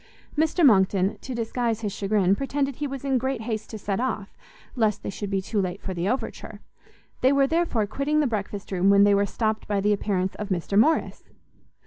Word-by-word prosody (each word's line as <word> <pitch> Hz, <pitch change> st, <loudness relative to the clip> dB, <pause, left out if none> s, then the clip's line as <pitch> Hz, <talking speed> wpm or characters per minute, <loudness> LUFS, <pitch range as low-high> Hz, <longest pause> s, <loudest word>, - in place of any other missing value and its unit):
Mr 315 Hz, +2 st, +2 dB
Monckton, 195 Hz, -4 st, +3 dB
to 260 Hz, -, -6 dB
disguise 230 Hz, -1 st, -1 dB
his 205 Hz, -3 st, -3 dB
chagrin, 195 Hz, -2 st, +2 dB
pretended 275 Hz, +1 st, -2 dB
he 295 Hz, -, -2 dB
was 275 Hz, 0 st, -6 dB
in 265 Hz, -2 st, +2 dB
great 260 Hz, -1 st, -2 dB
haste 220 Hz, -1 st, -4 dB
to 220 Hz, -, -6 dB
set 200 Hz, -1 st, -2 dB
off, 225 Hz, -5 st, -3 dB, 0.4 s
lest 220 Hz, -4 st, +1 dB
they -, -, -3 dB
should 205 Hz, 0 st, -5 dB
be 195 Hz, -1 st, -1 dB
too 205 Hz, +1 st, -1 dB
late 185 Hz, +1 st, -3 dB
for 190 Hz, -, -5 dB
the 175 Hz, +2 st, -1 dB
overture: 255 Hz, -, -4 dB, 0.6 s
they 260 Hz, -, +5 dB
were, 280 Hz, -1 st, +4 dB
therefore, 320 Hz, -8 st, +1 dB
quitting 280 Hz, +8 st, 0 dB
the 300 Hz, -, +3 dB
breakfast 205 Hz, -4 st, -4 dB
room, 190 Hz, +1 st, +2 dB
when 200 Hz, 0 st, +6 dB
they 205 Hz, 0 st, +5 dB
were 200 Hz, 0 st, +2 dB
stopt 220 Hz, +1 st, -2 dB
by 205 Hz, -1 st, 0 dB
the 210 Hz, +1 st, +2 dB
appearance 190 Hz, -2 st, -1 dB
of 210 Hz, -1 st, -5 dB
Mr 185 Hz, +1 st, -2 dB
Morrice. 305 Hz, +10 st, +2 dB
215 Hz, 205 wpm, -25 LUFS, 200-260 Hz, 0.6 s, when